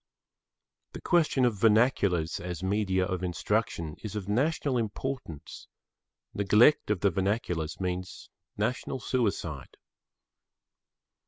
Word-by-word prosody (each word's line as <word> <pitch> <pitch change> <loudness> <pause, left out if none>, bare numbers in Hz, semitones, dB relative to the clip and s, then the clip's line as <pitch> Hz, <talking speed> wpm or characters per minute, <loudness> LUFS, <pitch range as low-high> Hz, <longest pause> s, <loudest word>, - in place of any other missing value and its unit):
The - - -8
question 155 -7 +2
of 110 -5 0
vernaculars 105 -7 +3
as 90 0 -6
media 95 -1 +1
of 95 -2 -3
instruction 85 -3 -2
is 110 -1 -6
of 100 -3 -4
national 130 +3 +1
importance; 110 - -5 0.7
neglect 105 +9 +4
of 105 -4 0
the 100 - +3
vernaculars 95 -4 -1
means 90 0 -4 0.3
national 130 +1 -2
suicide. 95 - -2
100 Hz, 100 wpm, -28 LUFS, 90-120 Hz, 0.7 s, neglect